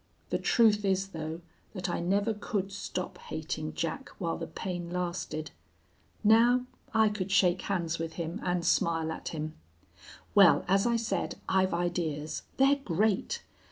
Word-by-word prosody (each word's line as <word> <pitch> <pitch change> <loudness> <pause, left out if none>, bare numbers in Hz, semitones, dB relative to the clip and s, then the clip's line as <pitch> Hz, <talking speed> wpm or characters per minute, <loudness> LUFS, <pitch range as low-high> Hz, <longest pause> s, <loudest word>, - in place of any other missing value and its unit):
The - - +1
truth 215 -3 +4
is, 195 0 +1
though, 160 -1 -5 0.3
that 185 -1 -2
I 175 - -1
never 200 +5 +1
could 205 -2 -3
stop 185 -2 -5
hating 155 0 -4
Jack 170 - -3
while 170 -3 -1
the 165 - -5
pain 175 -2 -5
lasted. 175 -3 -3 0.7
Now 235 +4 +5 0.3
I 220 -2 +4
could 200 -2 -3
shake 185 -2 +4
hands 170 -4 -1
with 165 0 -3
him 170 +4 -4
and 180 -1 0
smile 165 -1 +2
at - - -6
him. 155 -1 -4 0.8
"Well, 195 -5 +6
as 195 +4 +3
I 235 - +2
said, 230 -1 -1
I've 190 -2 +2
ideas. 170 -4 -2 0.2
They're 275 +1 +5
great. 205 - 0
180 Hz, 150 wpm, -30 LUFS, 165-205 Hz, 0.8 s, Well